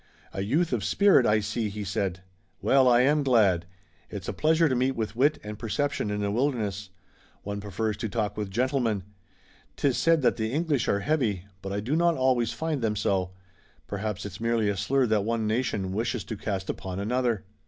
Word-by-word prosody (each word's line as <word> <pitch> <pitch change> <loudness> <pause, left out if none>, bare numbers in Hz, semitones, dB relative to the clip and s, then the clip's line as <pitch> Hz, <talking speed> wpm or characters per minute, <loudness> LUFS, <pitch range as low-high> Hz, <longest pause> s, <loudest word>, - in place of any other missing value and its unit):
"A 95 - -3
youth 150 - +1
of 115 -5 0
spirit, 200 - +4
I 105 0 +3
see," 110 +1 -2
he 105 +1 -5
said. 95 -1 -2 0.4
"Well, 135 -1 +4
I 120 0 +6
am 145 +3 +3
glad. 105 -10 +3 0.4
It's - - -7
a - - -2
pleasure 160 +1 +3
to 135 - 0
meet 130 +1 +1
with 110 -1 -3
wit 145 +5 +3
and 105 0 -7
perception 145 +1 -1
in 105 0 -2
the 100 0 0
wilderness. 105 -5 -1 0.5
One 100 0 -4
prefers 105 +1 -2
to 110 +1 -3
talk 105 -2 -2
with 105 -2 -3
gentlemen. 120 -2 0 0.7
'Tis 135 -3 +1
said 165 -3 +3
that - - +3
the 110 -1 -2
English 150 -3 0
are 100 - +1
heavy, 115 - 0 0.2
but 95 - -5
I 100 +1 -2
do 130 +8 -1
not 170 0 +3
always 125 -3 +2
find 150 +3 -2
them 110 -2 0
so. 95 -2 0 0.5
Perhaps 100 -1 -4
it's 100 0 -8
merely 115 -2 +1
a 100 - 0
slur 130 +7 +1
that 110 -3 +2
one 115 0 -1
nation 110 -4 -1
wishes 115 +4 -2
to 110 - -5
cast 100 -2 -3
upon 95 0 -6
another." 120 0 0
110 Hz, 195 wpm, -27 LUFS, 100-130 Hz, 0.7 s, I